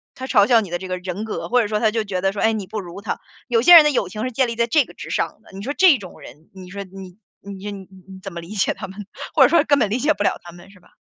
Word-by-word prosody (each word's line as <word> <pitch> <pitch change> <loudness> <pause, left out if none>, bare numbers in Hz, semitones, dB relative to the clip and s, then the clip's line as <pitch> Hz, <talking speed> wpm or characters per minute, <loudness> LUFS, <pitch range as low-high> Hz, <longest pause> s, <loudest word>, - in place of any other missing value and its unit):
他 260 0 -7
嘲 205 -5 +4
笑 230 -2 +5
你 200 - -7
的 175 - -2
这 190 +1 -8
个 185 - -3
人 180 +3 -5
格， 220 - -5
或 245 0 +3
者 210 - -1
说 210 0 -1
他 220 -2 +2
就 225 0 -1
觉 185 -3 -4
得 195 0 +1
说， 205 - -4
哎， 225 0 +3
你 200 -4 -4
不 215 - -5
如 180 +1 -9
他， 210 - -4 0.3
有 235 -3 +2
些 350 +7 +8
人 325 - +11
的 300 - +2
友 205 -9 -1
情 215 +2 -6
是 255 - -3
建 260 +2 +1
立 230 - -4
在 235 0 0
这 290 +2 +3
个 - - -15
之 - - -10
上 - - -3
的。 - - -19
你 195 - -8
说 275 +7 -4
这 365 -7 +6
种 190 -5 -12
人， 150 +6 -15
你 185 -1 -12
说 200 +1 -6
你 190 0 -12 0.2
你 195 -1 -10
说 205 - -5
你 195 -1 -9
你 190 0 -14
怎 195 -2 -8
么 170 - -6
理 170 - -13
解 210 -2 0
他 190 - -8
们， 195 +1 -10 0.3
或 - - +6
者 - - +6
说 335 - +4
根 285 -2 +2
本 215 -4 +1
理 225 - 0
解 300 +4 +2
不 205 - -3
了 - - 0
他 175 - -11
们， 175 +2 -15
是 185 - -19
吧？ - - -25
205 Hz, 370 characters per minute, -21 LUFS, 190-235 Hz, 0.3 s, 人